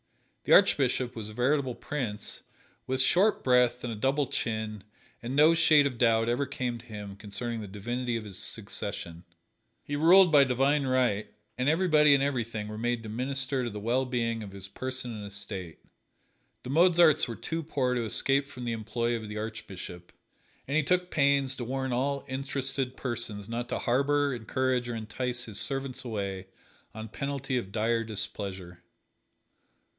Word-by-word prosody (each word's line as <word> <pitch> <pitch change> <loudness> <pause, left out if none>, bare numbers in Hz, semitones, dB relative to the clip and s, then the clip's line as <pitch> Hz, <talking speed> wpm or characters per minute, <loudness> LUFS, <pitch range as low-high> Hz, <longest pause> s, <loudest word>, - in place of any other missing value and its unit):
The - - +4
Archbishop 125 -1 +4
was 110 -2 -5
a - - -10
veritable 130 +2 +1
prince, 115 -8 -4 0.5
with 130 0 -1
short 200 +9 +3
breath 125 -1 +3
and 120 -2 -3
a - - -5
double 135 +6 +1
chin, 110 -4 -3 0.4
and 120 +3 -4
no 155 +3 +6
shade 155 -3 +5
of 125 -4 -2
doubt 115 -1 +3
ever 125 +4 0
came 125 -3 -3
to 120 - -15
him 105 -2 -7
concerning 110 +3 -4
the 105 - -7
divinity 120 +5 -3
of 115 - -6
his 100 -3 -6
succession. 85 0 -5 0.6
He 145 - -4
ruled 175 +4 +6
by 145 -2 +7
divine 135 +2 +2
right, 125 -5 +1 0.2
and 130 +2 +1
everybody 155 -3 +5
and 135 - +1
everything 115 -6 -2
were 105 0 -6
made 120 0 -1
to 110 - -7
minister 130 +3 0
to 120 - -2
the 105 -1 -6
well 120 +5 +1
being 115 -3 -1
of 100 -2 -8
his 100 -1 -6
person 130 +3 -5
and 105 -1 -7
estate. 100 -4 -5 0.9
The 125 - -5
Mozarts 165 -1 +5
were 115 - -5
too 165 +7 -4
poor 135 -5 -1
to 120 -1 0
escape 135 +5 +2
from 125 -3 -8
the 120 - -1
employ 115 +2 -1
of 110 -2 -6
the 105 - -6
Archbishop, 100 -5 -7 0.6
and 140 - -2
he 155 - +4
took 180 +4 0
pains 140 -2 +2
to 125 - -4
warn 130 +1 -2
all 140 +3 -1
interested 135 -1 -2
persons 115 -5 -3
not 120 +1 -4
to - - -1
harbor, 140 +3 +1
encourage 125 +1 -1
or 120 - -3
entice 120 +3 -3
his 110 -5 -5
servants 135 -2 -2
away 100 -5 -4 0.5
on 110 0 -6
penalty 135 +2 -3
of 115 -6 -2
dire 115 +2 +1
displeasure. 100 -4 -4
125 Hz, 170 wpm, -29 LUFS, 110-140 Hz, 0.9 s, by